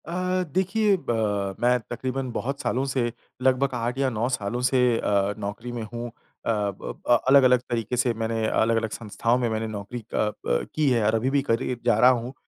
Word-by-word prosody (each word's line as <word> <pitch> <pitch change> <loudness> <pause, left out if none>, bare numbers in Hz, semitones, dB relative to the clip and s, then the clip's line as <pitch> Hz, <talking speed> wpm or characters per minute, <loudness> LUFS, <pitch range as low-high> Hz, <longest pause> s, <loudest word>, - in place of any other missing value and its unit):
अ, 185 +1 -1
देखिए 195 +3 +2
ब 105 -4 0
मैं 125 +1 +3
तक़रीबन 130 +2 -3
बहुत 135 +4 -3
सालों 130 +2 0
से 120 -3 0 0.3
लगभग 130 +1 +3
8 120 +1 -2
या 135 -1 +2
9 115 0 -1
सालों 120 -1 -2
से 130 +1 +2 0.2
अ, 100 -1 +1
नौकरी 105 +4 -5
में 120 -1 -4
हूँ। 120 0 -4 0.4
अ, - - +2
ब 105 +3 0
अलग-अलग 130 -2 +6
तरीके 115 +1 -2
से 120 -1 +2
मैंने 115 0 -2
अलग-अलग 115 0 +1
संस्थाओं 115 +2 -1
में 120 -2 0
मैंने 110 0 -2
नौकरी 105 +2 -6
अ, - - -1 0.3
ब - - +1
की 150 -2 +3
है 115 -4 +2
और 110 +1 +3
अभी 115 +4 +1
भी 140 0 +2
करे 125 -1 -1
जा 120 -3 +4
रहा 125 +2 +7
हूँ, 125 +1 -2
120 Hz, 190 wpm, -25 LUFS, 110-130 Hz, 0.4 s, रहा